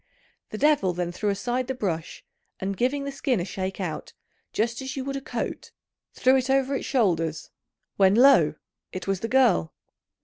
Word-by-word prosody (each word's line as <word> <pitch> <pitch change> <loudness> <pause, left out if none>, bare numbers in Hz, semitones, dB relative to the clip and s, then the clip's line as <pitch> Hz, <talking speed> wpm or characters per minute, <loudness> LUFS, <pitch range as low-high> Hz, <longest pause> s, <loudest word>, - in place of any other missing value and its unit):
The 215 - -6
devil 275 -9 +3
then 175 0 -2
threw 205 +4 -2
aside 240 +5 -1
the 265 - -2
brush, 170 -8 -4 0.3
and 195 +1 -2
giving 260 +7 0
the 280 - -4
skin 270 -4 0
a 175 - -2
shake 190 0 -4
out, 165 -5 -5 0.4
just 230 +3 -1
as 265 0 -5
you 265 -1 -4
would 275 0 -3
a 275 - -3
coat, 290 - -5 0.5
threw 260 +1 +4
it 260 0 -2
over 270 0 +2
its 275 - -3
shoulders, 165 - 0 0.5
when, 195 0 +5
lo! 235 - +6 0.4
it 185 - -6
was 195 -1 0
the 225 - -3
girl. 240 - +3
225 Hz, 180 wpm, -25 LUFS, 185-265 Hz, 0.5 s, lo